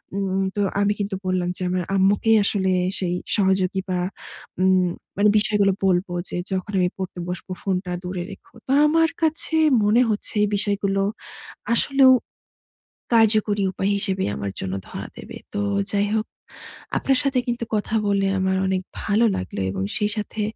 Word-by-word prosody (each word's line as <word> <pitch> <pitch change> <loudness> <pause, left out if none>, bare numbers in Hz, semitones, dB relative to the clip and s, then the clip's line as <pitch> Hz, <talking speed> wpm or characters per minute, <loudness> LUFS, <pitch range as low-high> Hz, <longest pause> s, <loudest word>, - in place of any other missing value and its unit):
উম 195 -1 -1
তো 205 - 0 0.2
আমি 205 +1 +2
কিন্তু 200 -1 -2
বললাম 180 -1 0
যে, - - -6
আমার 180 0 -1
আম্মুকে 195 +3 +3
আসলে 190 -2 +1 0.3
সেই 180 -2 -1 0.2
সহযোগী 190 -1 +2
বা, 180 -1 0 0.6
উম 185 -1 +4 0.3
মানে 205 +1 +4
বিষয়গুলো 205 -2 +2
বলবো 180 -1 +1 0.2
যে, - - -5 0.2
"যখন 190 +1 -2
আমি 180 -1 +2
পড়তে 185 -1 -5
বসবো, 180 +1 -6
ফোনটা 185 -2 -2
দূরে 180 -1 -4
রেখো।" 195 - -14
তো - - -2 0.2
আমার 325 +1 +3
কাছে 320 +1 +1 0.3
মনে 215 +4 +4
হচ্ছে 210 -1 -2
এই - - +3
বিষয়গুলো 200 -1 0 0.7
আসলেও 270 +1 +5 1.0
কার্যকরী 215 -2 +3
উপায় 195 +1 -1
হিসেবে 190 -1 -1
আমার 100 -1 -4
জন্য 95 - -4 0.2
ধরা - - -6
দেবে। - - -10 0.2
তো 100 - -1 0.3
যাই 205 0 +2
হোক, 220 0 0 0.7
আপনার 270 -1 +2
সাথে 270 -2 +1
কিন্তু 240 -1 -2
কথা 215 +1 -1
বলে 200 -1 +2
আমার 190 0 +1
অনেক 190 -1 0 0.2
ভালো 210 +3 +2
লাগলো 95 +1 -4
এবং 95 0 -3
সেই 210 - +1
সাথে 210 +1 -4
195 Hz, 160 wpm, -23 LUFS, 185-210 Hz, 1.0 s, আসলেও